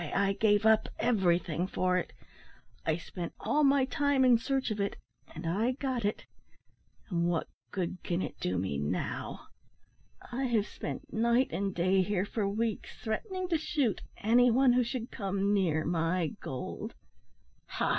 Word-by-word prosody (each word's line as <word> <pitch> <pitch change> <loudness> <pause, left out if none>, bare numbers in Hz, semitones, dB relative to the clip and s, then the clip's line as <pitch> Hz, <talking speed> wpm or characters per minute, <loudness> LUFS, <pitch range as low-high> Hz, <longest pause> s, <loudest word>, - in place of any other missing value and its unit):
I 195 0 +3
gave 205 +1 +3
up 220 0 +5
everything 180 -6 +1
for 185 -1 +1
it; - - -5 0.8
I 160 0 +2
spent 175 0 -6
all 300 +1 +1
my 275 -1 +5
time 285 -2 +2
in 245 -2 +6
search 265 0 -1
of 210 - -2
it 200 0 -1 0.4
and - - -6
I 210 +10 +1
got 255 -4 -2
it 205 - -1 0.9
and 170 -1 +1
what 170 -2 0 0.2
good 185 -1 -3
can 175 0 -1
it - - -6
do 90 0 -1
me 90 -6 -1
now? 75 +1 -3 0.8
I 260 +2 -1
have 225 -5 +2
spent 285 +6 -7
night 235 +3 +3
and 195 -1 -2
day 185 +2 +3
here 190 0 0
for 205 -1 -1
weeks, 220 +1 -2
threatening 370 - -2
to 330 -3 +2
shoot 285 - 0 0.2
any 245 +3 +4
one 255 +1 +5
who 250 0 +4
should 240 0 -4
come 200 0 0
near 165 -6 +2
my 165 0 +1
gold 130 -1 -5 0.7
Ha!" - - -1
205 Hz, 160 wpm, -31 LUFS, 180-245 Hz, 0.9 s, in